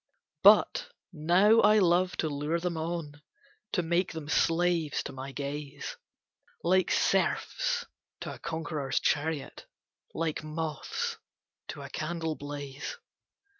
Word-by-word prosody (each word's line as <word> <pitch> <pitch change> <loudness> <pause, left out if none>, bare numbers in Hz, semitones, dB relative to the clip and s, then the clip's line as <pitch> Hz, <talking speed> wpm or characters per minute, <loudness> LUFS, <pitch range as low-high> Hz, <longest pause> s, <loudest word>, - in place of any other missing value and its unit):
But - - +6 0.3
now 180 +8 +5
I 210 0 +6
love 180 -1 +3
to 160 - 0
lure 150 +3 -1
them 175 0 -2
on, 160 -2 -4 0.5
To 180 - +1
make 170 +2 +1
them 155 -3 -6
slaves 165 -1 +2
to - - -6
my 135 +1 -6
gaze, 140 +1 -5 0.7
Like 185 +1 +3
serfs - - +1 0.4
to - - -5
a - - -11
conqueror's 160 -4 -2
chariot, 150 -1 -1 0.5
Like 160 -2 -1
moths 155 -1 -3 0.5
to 145 - -7
a 140 - -8
candle 160 0 -2
blaze. 145 - -6
160 Hz, 120 wpm, -29 LUFS, 145-175 Hz, 0.7 s, But